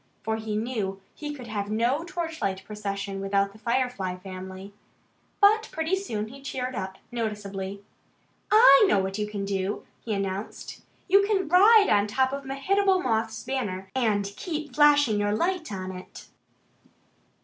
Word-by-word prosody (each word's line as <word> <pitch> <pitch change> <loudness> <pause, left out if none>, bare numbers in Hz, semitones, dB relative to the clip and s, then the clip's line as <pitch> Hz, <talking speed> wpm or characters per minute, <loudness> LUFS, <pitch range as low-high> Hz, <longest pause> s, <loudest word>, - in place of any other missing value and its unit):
For 220 0 -1
he 220 -1 -4
knew 215 -4 -2
he 295 -1 -6
could 270 -4 -8
have 205 -3 -4
no 240 +8 +1
torchlight 325 - -3
procession 200 -2 -4
without 195 0 +1
the 210 - -17
Firefly 235 -6 -1
family. 190 +1 -9 0.7
But 435 +2 +5
pretty 320 +4 0
soon 220 - -4
he 275 +3 -12
cheered 260 -2 -4
up 190 -4 -5
noticeably. 200 -4 -4 0.7
"I 430 - +8
know 210 - +3
what 190 +1 -1
you 210 - -1
can 205 -1 -4
do!" 195 0 -2 0.2
he 220 -3 -2
announced. 195 +1 -5 0.3
"You 395 +2 +5
can 390 -5 +1
ride 405 +5 +7
on 205 0 +3
top 260 +5 +1
of 280 0 -5
Mehitable 375 +8 +2
Moth's 225 -2 -1
banner 195 -8 -3
and 215 -6 +1
keep 305 - -5
flashing 290 -7 +5
your 205 0 +1
light 345 - -1
on 190 -1 -4
it!" 185 0 -10
220 Hz, 150 wpm, -26 LUFS, 200-295 Hz, 0.7 s, I